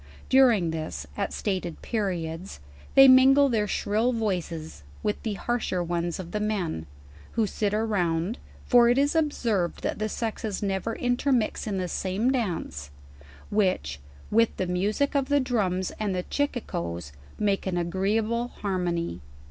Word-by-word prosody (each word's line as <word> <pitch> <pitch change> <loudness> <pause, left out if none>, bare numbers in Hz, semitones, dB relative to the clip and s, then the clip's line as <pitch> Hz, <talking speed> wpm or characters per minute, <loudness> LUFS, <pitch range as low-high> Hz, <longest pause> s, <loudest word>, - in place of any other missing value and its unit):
During 235 -11 +5
this, 155 - -4
at - - -2
stated 185 -5 -3
periods, 180 - -3 0.4
they 270 0 +10
mingle 270 +2 +7
their 215 -4 +1
shrill 220 +5 +1
voices, 175 - -3 0.2
with 210 - -1
the 220 -3 -2
rnarser 195 -5 -1
ones 170 0 -2
of 175 -2 -7
the 210 - -1
men, 190 - -2 0.5
who 225 -1 +2
sit 205 +1 -1
around 200 -2 0 0.3
(for 240 -1 +6
it 245 - +3
is 285 +1 +3
observed 235 - 0
that - - -2
the 215 0 -1
sexes 220 -2 -3
never 195 +3 -1
intermix 245 -2 0
in 200 -2 -1
the 185 -1 -1
same 195 +8 0
dance) 165 - -2 0.6
which, 185 - +1 0.3
with 230 +1 +3
the 185 - 0
music 200 +10 0
of 275 -1 +1
the 285 0 +4
drums 195 -8 0
and 205 -3 -1
chi 180 - 0
r - - -12 0.3
cicoes, 85 - -5 0.3
make 200 -2 0
an 180 -2 -1
agreeable 215 +7 0
harn 190 -6 -3
ony. 170 - -2
205 Hz, 150 wpm, -26 LUFS, 175-235 Hz, 0.6 s, they